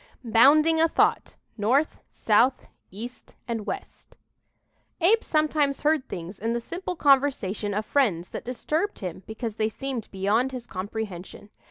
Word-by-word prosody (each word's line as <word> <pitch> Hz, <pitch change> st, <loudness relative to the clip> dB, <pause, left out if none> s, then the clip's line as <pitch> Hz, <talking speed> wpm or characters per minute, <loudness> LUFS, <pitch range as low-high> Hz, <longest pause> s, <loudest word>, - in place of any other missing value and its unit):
"BOUNDING 300 Hz, +8 st, +5 dB
A 325 Hz, -, +5 dB
THOUGHT -, -, +1 dB, 0.2 s
NORTH, 260 Hz, +9 st, +1 dB
SOUTH, 235 Hz, +5 st, +2 dB, 0.2 s
EAST 230 Hz, +6 st, -9 dB
AND 225 Hz, -3 st, -3 dB
WEST" 390 Hz, -, -7 dB, 0.8 s
Abe 415 Hz, +7 st, +4 dB
sometimes 305 Hz, -3 st, +1 dB
heard 300 Hz, -3 st, +1 dB
things 175 Hz, +3 st, -7 dB
in 225 Hz, +2 st, -1 dB
the 235 Hz, -, 0 dB
simple 360 Hz, +8 st, -5 dB
conversation 260 Hz, -, +2 dB
of 215 Hz, +1 st, -1 dB
friends 200 Hz, -13 st, +1 dB
that -, -, -6 dB
disturbed 310 Hz, +10 st, -2 dB
him 185 Hz, -2 st, -6 dB
because 220 Hz, 0 st, -5 dB
they 215 Hz, 0 st, +1 dB
seemed 255 Hz, -1 st, -5 dB
beyond 210 Hz, +7 st, 0 dB
his 250 Hz, -2 st, -6 dB
comprehension. 200 Hz, 0 st, -6 dB
240 Hz, 140 wpm, -26 LUFS, 210-290 Hz, 0.8 s, BOUNDING